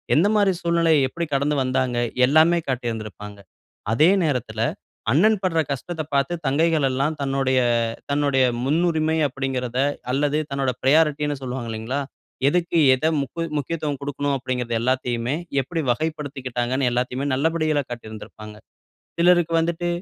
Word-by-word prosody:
எந்தமாரி 200 +4 +3
சூழ்நிலை 170 -1 +2 0.2
எப்பிடி 170 +6 -4
கடந்து 140 +2 +1
வந்தாங்க? 130 -1 0 0.3
எல்லாமே 160 +5 +4
காட்டியிருந்திருப்பாங்க. 110 -5 -4 0.6
அதே 155 +9 +5
நேரத்தில 135 -7 -2 0.5
அண்ணன் 210 - +4
பட்ற 165 -3 +1
கஷ்டத்த 160 +5 -4
பார்த்து 140 +4 +1
தங்கைகள் 155 +2 +2
எல்லாம் 140 +4 0
தன்னுடைய, 135 -1 +1 0.5
தன்னுடைய 140 -2 +2 0.2
முன்னுரிமை 160 +2 +1
அப்பிடிங்கிறத 130 -2 -3 0.3
அல்லது 145 +2 +1
தன்னோட 135 -2 0
பிரையாரிட்டினு 150 +1 +2
சொல்வாங்க 125 -2 -5
இல்லேங்களா! 115 +6 -3 0.5
எதுக்கு 175 +2 +1 0.2
எத 155 +5 +1
முக்க 140 +5 -5 0.2
முக்கியத்துவம் 150 -1 -3
குடுக்கனும் 145 0 -2
அப்பிடிங்கிறது 125 -2 -3
எல்லாத்தையுமே 125 +1 -1 0.3
எப்பிடி 165 +5 -3
வகைப்படுத்திக்கிட்டாங்கன்னு 135 -3 -2
எல்லாத்தையுமே 125 +2 -2
நல்லபடிகளா 155 +1 +1
காட்டியிருந்திருப்பாங்க. 110 -2 -9 0.6
சிலருக்கு 175 -1 +4
வந்துட்டு 170 +1 -1
140 Hz, 115 wpm, -23 LUFS, 130-160 Hz, 0.6 s, அதே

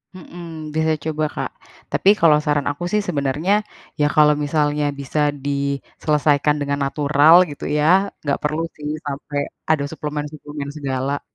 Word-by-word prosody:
Mhm, 175 -1 -11 0.3
bisa 160 0 +2
coba 155 -1 -1
Kak. - - -3 0.4
Tapi, 195 - +3
kalau 155 -3 +6
saran 150 -2 0
aku 145 +4 -7
sih, 210 0 +2
sebenarnya, 150 +3 0 0.5
ya, 145 - +3
kalau 150 -1 +6
misalnya 150 0 +1 0.2
bisa 140 +2 -3 0.3
diselesaikan 145 +1 0
dengan 140 0 -1
natural, 145 +2 +4 0.2
gitu 145 - -9 0.2
ya. 150 - +2 0.4
Nggak 145 -2 0
perlu 155 +2 -1
sih, 150 -1 -7 0.2
sampai 145 0 -4 0.3
ada 155 -3 +2
suplemen-suplemen 150 -1 -5
segala. 135 0 -2
150 Hz, 140 wpm, -21 LUFS, 140-155 Hz, 0.5 s, kalau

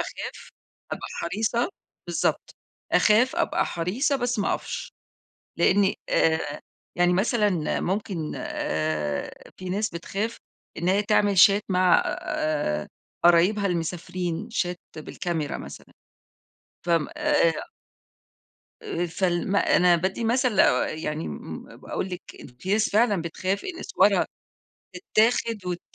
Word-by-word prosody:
أخاف، - - -6 0.4
أبقى - - -5
حريصة، 220 - 0 0.4
بالضبط، - - -1 0.4
أخاف، 230 +5 +4
أبقى - - +1
حريصة، 220 - 0
بس 245 -2 -1
ما 205 - +1
أقفش؛ - - -6 0.7
لأني 195 +3 +3
آآ، 160 -2 +1 0.4
يعني 175 0 +4
مثلًا 200 -4 +1
ممكن، 185 -4 -2
آآ، 75 -2 -3
في 185 - -7
ناس 205 +4 -1
بتخاف، 200 +6 -3 0.4
إن 175 - -1
هي 195 +2 +3
تعمل 205 -1 +2
Chat 200 +3 +7
مع، 185 -1 +4
آآ، 145 - -2 0.4
قرايبها 180 +5 +5
المسافرين 180 +2 -3
Chat 180 -6 -1 0.2
بالكاميرا 160 -1 -3
مثلًا - - -10 0.9
ف - - -9
آمم، 165 -3 +2
آآ 165 -2 +1 1.1
آآ 175 +1 -2
فال 175 +1 -1
ما 200 - +3 0.2
أنا 180 -1 +5
بادّي 190 +7 -2
مثل 240 -1 +2
لو، - - +7
آآ، - - +3
يعني، 155 0 -3
امم، 75 - -7
امم، - - -13
باقول 185 - -4
لِك 180 -1 -6 0.2
إن - - -10
في 190 +9 -2
ناس 220 +1 +2
فعلًا 210 -5 +3
بتخاف 185 +4 -2
إن 365 -2 -5
صورها - - +3 0.7
تتاخد 230 - +1
وت 175 -1 -2
185 Hz, 125 wpm, -25 LUFS, 170-210 Hz, 1.1 s, Chat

